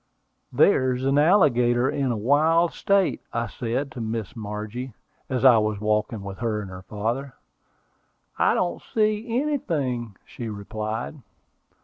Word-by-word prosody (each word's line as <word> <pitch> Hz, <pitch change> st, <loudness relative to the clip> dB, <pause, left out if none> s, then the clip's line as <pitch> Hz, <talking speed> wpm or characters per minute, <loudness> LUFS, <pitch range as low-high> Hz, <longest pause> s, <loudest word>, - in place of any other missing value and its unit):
"There 130 Hz, -1 st, +4 dB
is 130 Hz, +1 st, -4 dB
an 135 Hz, +1 st, +3 dB
alligator 130 Hz, -, +4 dB
in 140 Hz, -2 st, 0 dB
the 120 Hz, -, 0 dB
wild 155 Hz, +9 st, +3 dB
state," 200 Hz, -2 st, +1 dB
I 115 Hz, 0 st, 0 dB
said 125 Hz, +5 st, -3 dB
to 120 Hz, -, -7 dB
Miss 110 Hz, -2 st, -4 dB
Margie, 110 Hz, +3 st, -6 dB, 0.3 s
as 130 Hz, 0 st, 0 dB
I 120 Hz, -4 st, +8 dB
was 105 Hz, -1 st, -1 dB
walking 105 Hz, 0 st, -1 dB
with 100 Hz, -1 st, -7 dB
her 115 Hz, -3 st, -1 dB
and 100 Hz, -3 st, -7 dB
her 90 Hz, 0 st, -8 dB
father. 115 Hz, +7 st, -3 dB, 1.0 s
"I -, -, +4 dB
don't 85 Hz, -1 st, -1 dB
see 215 Hz, +1 st, 0 dB
anything," 140 Hz, -, -2 dB
she 115 Hz, -2 st, -7 dB
replied. 110 Hz, +6 st, -5 dB
120 Hz, 140 wpm, -24 LUFS, 110-140 Hz, 1.0 s, I